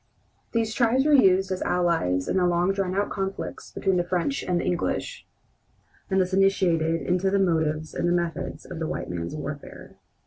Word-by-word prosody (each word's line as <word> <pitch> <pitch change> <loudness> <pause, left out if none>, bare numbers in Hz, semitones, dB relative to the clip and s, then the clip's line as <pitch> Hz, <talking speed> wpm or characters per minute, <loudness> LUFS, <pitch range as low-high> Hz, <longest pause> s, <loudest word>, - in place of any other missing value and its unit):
These 225 -1 0
tribes 255 +2 +2
were 300 - +4
used 190 -7 +5
as 185 - -2
allies 165 - +1
in - - 0
the 180 -1 +3
long 175 +2 +2
drawn 190 -2 -2
out 200 +1 0
conflicts 195 -1 -4
between 190 -1 0
the 175 - +2
French 180 +10 -1
and 180 -1 0
the - - -3
English, 175 -1 -2 0.8
and 190 -1 +2
thus 185 0 0
initiated 175 -4 +2
into 180 +2 +1
the 200 - +2
motives 160 -4 0
and 175 - 0
the - - +2
methods 170 -1 -2
of 160 - -7
the 160 - -2
white - - -4
man's 85 - -4
warfare. 145 -1 -8
180 Hz, 185 wpm, -25 LUFS, 165-195 Hz, 0.8 s, used